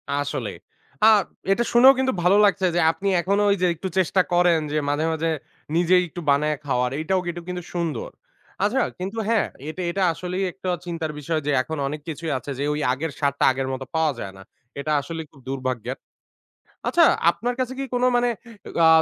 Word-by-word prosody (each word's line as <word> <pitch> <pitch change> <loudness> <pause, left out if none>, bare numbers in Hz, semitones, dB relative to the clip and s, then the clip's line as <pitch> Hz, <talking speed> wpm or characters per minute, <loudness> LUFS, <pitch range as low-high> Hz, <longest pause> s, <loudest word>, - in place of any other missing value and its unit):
আসলেই। 140 -7 -2 0.5
আ - - +9 0.4
এটা 235 +5 +3
শুনেও 255 +3 +8
কিন্তু 260 0 +1
ভালো 185 +3 +5
লাগছে 200 -1 +2
যে, - - +3
আপনি 195 +4 -5
এখনো 200 +4 +1
ওই 200 - +4
যে, - - +4
একটু 180 +4 -5
চেষ্টা 185 +1 +3
করেন 175 -1 +4
যে 155 - 0
মাঝে, 145 +2 0
মাঝে 160 +1 -1 0.5
নিজেই 180 +1 +4
একটু 175 - -7
বানায়ে 150 +2 +2
খাওয়ার, 125 -3 +1
এইটাও 185 +4 +1
এটুক 175 0 -6
কিন্তু 180 -1 -4
সুন্দর। 165 -8 -2 0.5
আচ্ছা 235 +6 +2 0.2
কিন্তু 195 +5 -5
হ্যাঁ 225 -2 +2 0.2
এটা 170 +4 -5
এটা 195 +2 0
আসলেই 180 +4 -3
একটা 185 +1 -6 0.2
চিন্তার 165 -3 -3
বিষয় 155 +2 -1
যে, - - +2
এখন 160 +4 -5
অনেক 150 +2 -5
কিছুই 165 0 -4
আছে 130 +3 -7
যে, - - 0
ওই 150 - -2
আগের 155 +4 -3
স্বাদটা 140 -1 +1
আগের 130 0 -2
মত 130 - -5
পাওয়া 160 -1 +3
যায় 95 -3 -6
না। 95 - -12 0.4
এটা 155 +2 -2
আসলেই 160 +3 -6
খুব 140 - -19
দুর্ভাগ্যের। 130 -4 -3 0.9
আচ্ছা, - - +5 0.3
আপনার 240 +7 -3
কাছে 255 0 -1
কি 275 - -2
কোন 245 - 0
মানে 245 0 +2 0.4
এগ - - -10
আ - - +8
165 Hz, 190 wpm, -23 LUFS, 145-190 Hz, 0.9 s, আ